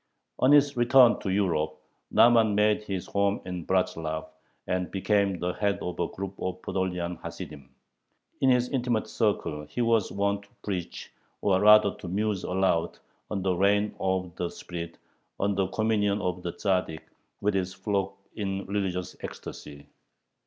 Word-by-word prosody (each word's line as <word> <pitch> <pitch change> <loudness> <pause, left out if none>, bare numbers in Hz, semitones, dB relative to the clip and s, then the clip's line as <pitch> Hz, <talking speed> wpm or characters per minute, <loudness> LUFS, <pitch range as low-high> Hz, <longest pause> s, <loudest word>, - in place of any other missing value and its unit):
On 130 - +4
his 145 -1 +5
return 120 0 +6
to 100 - -4
Europe, 80 -6 0 0.3
Nahman 115 -3 +5
made 105 0 +3
his 95 -3 -4
home 100 0 +1
in 90 -2 -5
Bratzlav, 80 -4 0 0.4
and 90 -1 -1
became 100 -1 +1
the 90 +1 -2
head 100 0 0
of 90 -1 -5
a 85 - +1
group 95 0 -6
of 95 0 -3
Podolian 90 -2 -2
Hasidim. 70 -3 -8 0.7
In 135 - +4
his 125 -1 +3
intimate 120 -4 0
circle 100 -9 -1
he - - -6
was 115 -4 +2
wont 100 0 0
to - - -28
preach, 95 -4 -5 0.3
or 95 -2 +3
rather 105 -1 +7
to - - -10
muse 100 +1 -1
aloud, 90 -3 0 0.3
on 100 -3 -2
the 95 -1 +2
reign 100 +3 +2
of 95 -2 -1
the 90 - -2
spirit, 85 -1 -7 0.4
on 100 +1 +1
the 95 -1 0
communion 105 0 +1
of 90 -3 -2
the 85 -1 -4
Tzaddik 90 -4 -1 0.4
with 105 +1 +1
his 95 -1 -1
flock 100 0 -2 0.2
in 100 -2 -3
religious 95 -2 -2
ecstasy. 70 -1 -8
95 Hz, 155 wpm, -27 LUFS, 90-105 Hz, 0.7 s, rather